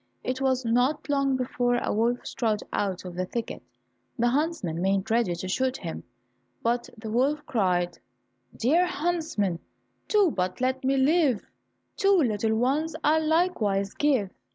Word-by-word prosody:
It 255 Hz, +1 st, -3 dB
was 260 Hz, -2 st, +1 dB
not 245 Hz, +7 st, +1 dB
long 275 Hz, -2 st, +2 dB
before 245 Hz, -1 st, 0 dB
a -, -, -1 dB
wolf 235 Hz, +3 st, 0 dB
strode 220 Hz, -3 st, -1 dB
out 190 Hz, -2 st, -2 dB
of 180 Hz, -, -6 dB
the 185 Hz, +1 st, -3 dB
thicket; 230 Hz, +3 st, -4 dB, 0.6 s
the 240 Hz, 0 st, +3 dB
huntsmen 260 Hz, -, -1 dB
made 195 Hz, +3 st, 0 dB
ready 225 Hz, -6 st, +2 dB
to 180 Hz, +2 st, -5 dB
shoot 260 Hz, +7 st, 0 dB
him, 165 Hz, -3 st, -6 dB, 0.6 s
but 240 Hz, +1 st, 0 dB
the 220 Hz, 0 st, -6 dB
wolf 285 Hz, +6 st, +1 dB
cried, 180 Hz, -, 0 dB, 0.6 s
"Dear 330 Hz, +10 st, +3 dB
huntsman, 310 Hz, -, -1 dB, 0.5 s
do 410 Hz, -6 st, +4 dB
but 180 Hz, -4 st, -2 dB
let 260 Hz, +1 st, 0 dB
me 270 Hz, +1 st, +2 dB
live, 275 Hz, -, +3 dB, 0.5 s
Two 395 Hz, 0 st, +4 dB
little 220 Hz, -, +1 dB
ones 285 Hz, +8 st, 0 dB
I'll 310 Hz, +1 st, +3 dB
likewise 220 Hz, -, +1 dB
give." 260 Hz, -10 st, +1 dB
245 Hz, 150 wpm, -26 LUFS, 205-295 Hz, 0.6 s, do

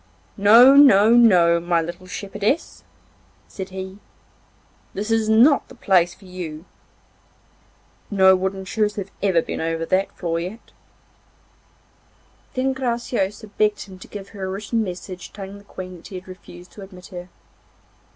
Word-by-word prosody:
'No, 230 Hz, +6 st, +7 dB
no, 210 Hz, -9 st, +6 dB
my 170 Hz, 0 st, 0 dB
little 175 Hz, +3 st, -6 dB
shepherdess,' 205 Hz, -, -3 dB, 0.6 s
said 190 Hz, -1 st, -8 dB
he, 190 Hz, +1 st, -8 dB, 1.0 s
'that 210 Hz, +3 st, -3 dB
is 225 Hz, -1 st, +1 dB
not 245 Hz, +7 st, +4 dB
the -, -, -15 dB
place 180 Hz, -6 st, +2 dB
for 195 Hz, -, -19 dB
you. 175 Hz, -3 st, -8 dB, 1.4 s
No 190 Hz, -2 st, +5 dB
wooden 190 Hz, +1 st, -3 dB
shoes 210 Hz, +1 st, -1 dB
have 195 Hz, -1 st, -6 dB
ever 185 Hz, -5 st, +2 dB
been -, -, -5 dB
over 165 Hz, 0 st, -2 dB
that 190 Hz, +3 st, 0 dB
floor 165 Hz, -2 st, -2 dB
yet.' 185 Hz, +7 st, -8 dB, 1.8 s
Then 265 Hz, +1 st, 0 dB
Graciosa 235 Hz, -5 st, -2 dB
begged 210 Hz, 0 st, 0 dB
him 190 Hz, -2 st, -13 dB
to -, -, -12 dB
give 200 Hz, -1 st, -9 dB
her 195 Hz, -3 st, -7 dB
a -, -, -4 dB
written 210 Hz, +4 st, -2 dB
message 185 Hz, -1 st, -8 dB
telling 200 Hz, 0 st, -9 dB
the -, -, -18 dB
Queen 185 Hz, -2 st, -9 dB
that 165 Hz, -, -13 dB
he 190 Hz, -, -10 dB
had 185 Hz, +1 st, -9 dB
refused 180 Hz, -1 st, -13 dB
to 210 Hz, -, -12 dB
admit 185 Hz, -2 st, -12 dB
her. 180 Hz, -1 st, -9 dB
195 Hz, 145 wpm, -22 LUFS, 180-215 Hz, 1.8 s, No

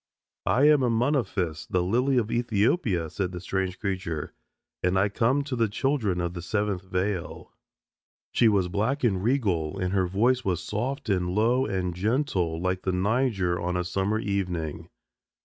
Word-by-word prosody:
"I 130 Hz, -, +3 dB
am 150 Hz, 0 st, +6 dB
Amunophis, 115 Hz, -, 0 dB
the 90 Hz, -1 st, +1 dB
Lily 125 Hz, +8 st, +2 dB
of 115 Hz, -2 st, +1 dB
Ethiopia," 110 Hz, -, +1 dB
said 90 Hz, +3 st, -3 dB
the 90 Hz, -, -6 dB
strange 95 Hz, +1 st, -2 dB
creature. 95 Hz, -6 st, -3 dB, 0.5 s
"And 90 Hz, +1 st, +1 dB
I 100 Hz, +2 st, +3 dB
come 125 Hz, +7 st, +1 dB
to 140 Hz, -2 st, -4 dB
the 115 Hz, -2 st, +2 dB
children 110 Hz, -5 st, 0 dB
of 85 Hz, 0 st, -2 dB
the 90 Hz, -, -6 dB
Seventh 100 Hz, +1 st, -1 dB
Veil." 95 Hz, -1 st, -3 dB, 0.8 s
She 120 Hz, -, +4 dB
was 100 Hz, -4 st, +3 dB
black 110 Hz, -, -1 dB
and 95 Hz, -6 st, +1 dB
regal, 100 Hz, -, 0 dB
and 90 Hz, -1 st, -1 dB
her 95 Hz, -2 st, +2 dB
voice 120 Hz, +7 st, +2 dB
was 90 Hz, -3 st, -1 dB
soft 130 Hz, +9 st, -3 dB
and 90 Hz, -4 st, +1 dB
low 115 Hz, +7 st, +2 dB
and 95 Hz, -3 st, -2 dB
gentle 95 Hz, -, 0 dB
like 95 Hz, +1 st, -1 dB
the 95 Hz, -, -1 dB
Niger 95 Hz, -2 st, +1 dB
on 90 Hz, 0 st, -1 dB
a 90 Hz, -, 0 dB
summer 95 Hz, +4 st, 0 dB
evening. 90 Hz, -6 st, -3 dB
100 Hz, 165 wpm, -26 LUFS, 90-120 Hz, 0.8 s, am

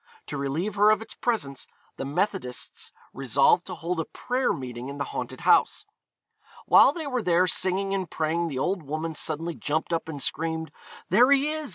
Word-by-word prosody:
To -, -, -5 dB
relieve 155 Hz, +9 st, -2 dB
her 210 Hz, +1 st, +6 dB
of 215 Hz, -, +4 dB
its -, -, -11 dB
presence 145 Hz, -, -2 dB, 0.3 s
the -, -, -4 dB
Methodists 145 Hz, -3 st, -3 dB, 0.2 s
resolved 135 Hz, +6 st, +3 dB
to 185 Hz, -, -5 dB
hold 170 Hz, +1 st, -3 dB
a 165 Hz, -, -1 dB
prayer 255 Hz, +1 st, -1 dB
meeting 125 Hz, -1 st, -5 dB
in 140 Hz, -, -7 dB
the 140 Hz, -, -1 dB
haunted -, -, -5 dB
house. -, -, +3 dB, 0.8 s
While -, -, +7 dB
they 320 Hz, +1 st, -6 dB
were 255 Hz, -3 st, -1 dB
there 180 Hz, -2 st, +3 dB
singing 190 Hz, +2 st, +1 dB
and 190 Hz, -3 st, -2 dB
praying 165 Hz, +2 st, -1 dB
the 140 Hz, -5 st, -4 dB
old 180 Hz, +7 st, 0 dB
woman 155 Hz, +2 st, -4 dB
suddenly 160 Hz, +2 st, -2 dB
jumped 155 Hz, +2 st, -2 dB
up 165 Hz, -1 st, -2 dB
and 145 Hz, -3 st, -5 dB
screamed, 160 Hz, +3 st, -2 dB, 0.4 s
'There 240 Hz, +7 st, +6 dB
he 280 Hz, +2 st, +4 dB
is! 310 Hz, -2 st, -4 dB
165 Hz, 185 wpm, -26 LUFS, 145-200 Hz, 0.8 s, While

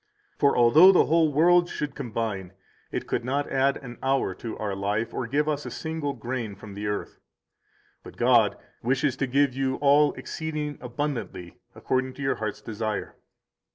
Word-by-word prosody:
For 140 Hz, -, +2 dB
although 150 Hz, +11 st, +8 dB
the 185 Hz, -, +4 dB
whole 160 Hz, -1 st, +3 dB
world 175 Hz, +4 st, +4 dB
should 150 Hz, -1 st, -4 dB
combine, 105 Hz, -5 st, -4 dB, 0.4 s
it -, -, -3 dB
could -, -, -2 dB
not 140 Hz, +3 st, -2 dB
add 135 Hz, +1 st, +2 dB
an 125 Hz, -3 st, -10 dB
hour 135 Hz, -7 st, +1 dB
to 110 Hz, +4 st, -7 dB
our 105 Hz, -2 st, -3 dB
life 105 Hz, +4 st, -2 dB
or 125 Hz, -, -3 dB
give 145 Hz, +5 st, 0 dB
us 150 Hz, -1 st, -1 dB
a -, -, -6 dB
single 160 Hz, -3 st, -3 dB
grain 120 Hz, -5 st, -4 dB
from 100 Hz, 0 st, -11 dB
the 105 Hz, +1 st, -4 dB
earth. 105 Hz, 0 st, -4 dB, 0.8 s
But -, -, -13 dB
God -, -, +4 dB, 0.2 s
wishes 130 Hz, +2 st, +1 dB
to 135 Hz, -, -1 dB
give 140 Hz, +1 st, +2 dB
you 130 Hz, 0 st, -1 dB
all 145 Hz, +1 st, +4 dB
exceeding 150 Hz, -2 st, -5 dB
abundantly 120 Hz, -, -5 dB, 0.2 s
according 130 Hz, 0 st, -1 dB
to 140 Hz, -, -6 dB
your 135 Hz, -, 0 dB
heart's 110 Hz, -2 st, -4 dB
desire. 110 Hz, -1 st, -4 dB
130 Hz, 170 wpm, -26 LUFS, 110-145 Hz, 0.8 s, although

